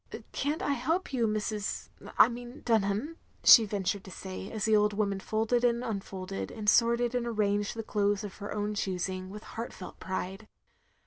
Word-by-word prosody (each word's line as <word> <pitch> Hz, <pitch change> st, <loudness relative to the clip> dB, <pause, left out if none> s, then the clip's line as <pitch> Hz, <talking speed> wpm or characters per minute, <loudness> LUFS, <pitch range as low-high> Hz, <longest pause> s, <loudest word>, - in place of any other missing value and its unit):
"Can't 295 Hz, +3 st, -1 dB
I -, -, +1 dB
help 310 Hz, +6 st, -1 dB
you, 235 Hz, -3 st, +2 dB
Mrs. 215 Hz, -1 st, -2 dB
— -, -, -12 dB
I -, -, +9 dB
mean 245 Hz, +2 st, -8 dB
Dimham," 225 Hz, +7 st, +1 dB, 0.3 s
she 230 Hz, -, +10 dB
ventured 200 Hz, -1 st, -2 dB
to -, -, -9 dB
say, 190 Hz, +1 st, -7 dB
as 215 Hz, -3 st, -2 dB
the 220 Hz, -1 st, +4 dB
old 210 Hz, 0 st, +3 dB
woman 200 Hz, -2 st, 0 dB
folded 225 Hz, +4 st, 0 dB
and 240 Hz, 0 st, +2 dB
unfolded, 195 Hz, -4 st, -4 dB
and 215 Hz, -2 st, -7 dB
sorted 235 Hz, +2 st, +4 dB
and 245 Hz, -1 st, -1 dB
arranged 205 Hz, -2 st, 0 dB
the 225 Hz, -, -4 dB
clothes 205 Hz, -1 st, 0 dB
of 205 Hz, -2 st, -7 dB
her 205 Hz, 0 st, -6 dB
own 210 Hz, 0 st, -2 dB
choosing, 185 Hz, -1 st, -2 dB
with 210 Hz, +2 st, -9 dB
heartfelt 225 Hz, -4 st, -8 dB
pride. 190 Hz, +2 st, -4 dB
210 Hz, 180 wpm, -30 LUFS, 200-235 Hz, 0.3 s, she